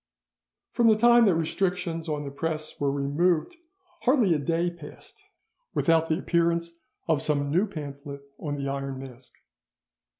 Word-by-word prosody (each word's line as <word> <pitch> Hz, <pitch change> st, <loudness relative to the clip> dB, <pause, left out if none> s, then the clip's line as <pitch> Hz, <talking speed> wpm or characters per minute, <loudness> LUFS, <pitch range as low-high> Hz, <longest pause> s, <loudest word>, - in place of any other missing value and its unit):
From 235 Hz, -, +3 dB
the 220 Hz, -, +6 dB
time 240 Hz, +1 st, +6 dB
that 190 Hz, -5 st, +4 dB
restrictions 165 Hz, 0 st, -1 dB
on 150 Hz, -1 st, -2 dB
the 140 Hz, -, -6 dB
press 155 Hz, +1 st, -4 dB
were 140 Hz, -1 st, +1 dB
removed, 155 Hz, -, 0 dB, 0.4 s
hardly 245 Hz, -, +3 dB
a 155 Hz, -, 0 dB
day 170 Hz, +4 st, 0 dB
passed 165 Hz, -4 st, -13 dB, 0.5 s
without 165 Hz, -1 st, +2 dB
the 155 Hz, -, +2 dB
appearance 170 Hz, -1 st, 0 dB, 0.4 s
of 160 Hz, -4 st, +2 dB
some 145 Hz, -1 st, 0 dB
new 185 Hz, +7 st, +2 dB
pamphlet 140 Hz, -5 st, -8 dB, 0.2 s
on 145 Hz, -2 st, -3 dB
the 140 Hz, -1 st, -4 dB
Iron 135 Hz, -1 st, -3 dB
Mask. 130 Hz, -1 st, -11 dB
160 Hz, 145 wpm, -26 LUFS, 140-175 Hz, 0.5 s, the